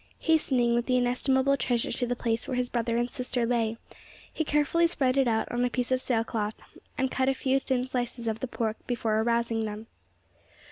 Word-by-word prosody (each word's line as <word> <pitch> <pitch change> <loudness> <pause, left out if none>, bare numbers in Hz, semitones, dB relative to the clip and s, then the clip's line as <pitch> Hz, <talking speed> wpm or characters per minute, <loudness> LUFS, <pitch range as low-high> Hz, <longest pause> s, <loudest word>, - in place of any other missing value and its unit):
Hastening 265 -7 +2
with 240 0 0
the 255 -1 +3
inestimable 265 +2 +2
treasure 240 -3 0
to 245 0 -1
the 245 - -1
place 230 -1 -1
where 255 - -2
his 250 -1 0
brother 235 -1 0
and 240 0 +1
sister 250 -1 -2
lay, 230 -2 0 0.6
he 320 - -1
carefully 300 +3 +2
spread 265 -6 +1
it 270 -2 +3
out 220 -1 +1
on 240 0 0
a 245 - +2
piece 250 0 -2
of 255 0 +2
sailcloth, 225 -3 -1 0.4
and 265 -1 0
cut 260 0 +1
a 270 - +1
few 265 +1 +1
thin 255 -2 -1
slices 245 -2 -3
of 220 0 -1
the 260 - -3
pork 225 -2 -2
before 225 -3 0
arousing 235 -1 0
them. 210 +1 -6
245 Hz, 200 wpm, -28 LUFS, 230-260 Hz, 0.6 s, the